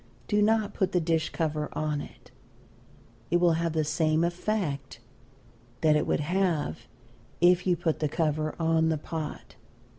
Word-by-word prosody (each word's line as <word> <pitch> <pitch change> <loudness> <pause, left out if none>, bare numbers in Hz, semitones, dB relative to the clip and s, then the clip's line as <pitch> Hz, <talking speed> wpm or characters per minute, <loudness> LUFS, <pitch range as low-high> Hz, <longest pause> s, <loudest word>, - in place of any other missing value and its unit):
Do 210 -1 +2
not 215 -1 +2
put 190 - -1
the 180 - +3
dish 160 -1 0
cover 150 -2 -2
on 150 -1 -1
it - - -13 1.1
will 175 -1 +4
have 165 0 0
the 160 -1 +1
same 155 +1 +1
effect 170 - -2 0.8
that 155 -1 +4
it 150 - +1
would - - +1
have 160 -7 -1 0.5
if 180 +1 +4
you 180 -1 +3
put 160 -2 -1
the 150 - 0
cover 155 -1 -1
on 160 0 +2
the 160 - +1
pot. 155 0 -6
160 Hz, 150 wpm, -28 LUFS, 155-175 Hz, 1.1 s, will